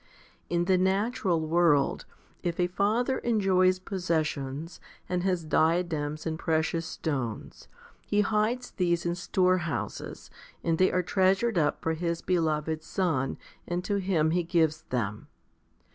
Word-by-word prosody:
In 175 0 +1
the 185 0 +3
natural 190 -1 +1
world, 160 -3 +2 0.4
if 170 -1 -3
a 180 - +4
father 215 +8 +1
enjoys 190 -5 +3
possessions, 160 -5 -3 0.3
and 180 -1 -1
has 180 -3 0
diadems 155 -2 +1
and 160 0 -3
precious 160 0 0
stones, 130 -8 -4 0.4
he 205 - +3
hides 220 +4 0
these 175 -2 0
in 170 - +1
storehouses, 180 -2 -1 0.3
and 165 -1 0
they 185 - +4
are 180 - +1
treasured 190 +3 +2
up 150 - 0
for 160 - +1
his 170 +1 -2
beloved 160 -3 0
son, 160 -6 -1 0.3
and 175 +1 -2
to 205 +1 0
him 180 -5 +1
he 175 +1 +2
gives 160 -2 +1
them. 110 -4 -2
175 Hz, 130 wpm, -28 LUFS, 160-185 Hz, 0.4 s, a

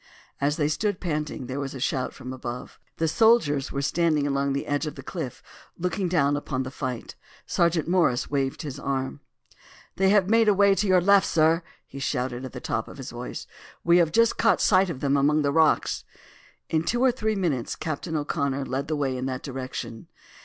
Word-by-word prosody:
As 145 +2 +1
they 150 -3 +2
stood 200 +5 -1
panting 150 -6 -3
there 130 +3 -4
was 140 -1 -4
a - - -6
shout 130 0 -1
from 130 +1 -8
above. 125 -1 -7 0.2
The 165 - +1
soldiers 160 - +3
were 140 - -2
standing 155 -1 +1
along 140 -1 0
the 140 - -2
edge 145 +2 -1
of 150 - -5
the - - -9
cliff, - - -6 0.3
looking 180 +2 -1
down 145 -5 +2
upon 135 -2 -2
the 130 - -6
fight. 130 -3 -5 0.3
Sergeant 170 -2 +1
Morris 170 -8 +2
waved 135 +1 -1
his 145 -4 -6
arm. 135 0 -2 0.8
"They 190 0 +3
have 200 -2 +4
made 225 +1 +4
away 200 -1 +5
to 205 +1 0
your 185 -1 +5
left, 200 +2 +5
sir!" 160 +1 +3 0.2
he 140 - -10
shouted 130 -2 -2
at 130 - -7
the - - -7
top - - -2
of - - -11
his - - -7
voice. - - -6 0.4
"We 170 +1 +5
have 170 -3 +3
just 230 +4 +3
caught 225 - +4
sight 190 -1 +4
of 135 -6 -5
them 140 0 +2
among 150 +2 +3
the 140 - +1
rocks!" 160 +1 +2 0.6
In 160 - +1
two 240 +8 0
or 260 - +5
three 220 -2 -1
minutes 160 - -1
Captain 160 +1 -4
O'Connor 140 -2 -1
led 135 +3 -3
the 155 - -1
way 135 -3 -1
in 130 +1 -3
that 130 -1 -4
direction. 130 -4 -6
150 Hz, 205 wpm, -25 LUFS, 135-180 Hz, 0.8 s, away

